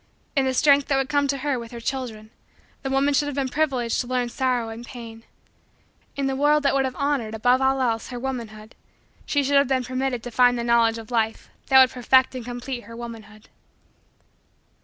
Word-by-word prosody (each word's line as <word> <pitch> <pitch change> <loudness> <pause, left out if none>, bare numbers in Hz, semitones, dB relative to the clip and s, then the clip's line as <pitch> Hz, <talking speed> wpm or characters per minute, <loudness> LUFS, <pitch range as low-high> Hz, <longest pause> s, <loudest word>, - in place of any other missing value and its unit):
In 275 -2 +2
the 260 - 0
strength 285 0 +4
that 275 - +1
would 270 -1 -1
come 285 -1 +2
to 275 0 -1
her 275 -1 -1
with 230 -1 -8
her 235 - -7
children, 230 -4 -5 0.5
the 270 - -4
woman 275 +2 +2
should 290 +1 +2
have 290 - -4
been 275 -2 -1
privileged 260 -6 0
to 245 - -7
learn 250 -1 -1
sorrow 245 -2 -1
and 225 +1 -8
pain. 230 -2 -10 0.9
In 280 - -2
the 270 0 -1
world 295 +2 +3
that 280 - +2
would 270 -1 +2
have 260 -1 -4
honored, 275 -6 -1
above 245 +4 +2
all 265 0 +2
else, 230 -3 -1
her 245 - -7
womanhood, 230 -4 -6 0.5
she 285 -1 +1
should 280 +1 +2
have 280 - +4
been 260 -1 0
permitted 255 -1 -2
to 245 - -7
find 245 +1 +4
the 235 - -2
knowledge 235 -1 +3
of 225 +1 -10
life 225 -2 -1 0.2
that 265 -1 +7
would 260 -1 +6
perfect 260 +2 +3
and 255 -2 -6
complete 245 +1 -6
her 230 - -11
womanhood. 225 -2 -10
255 Hz, 210 wpm, -23 LUFS, 235-270 Hz, 0.9 s, that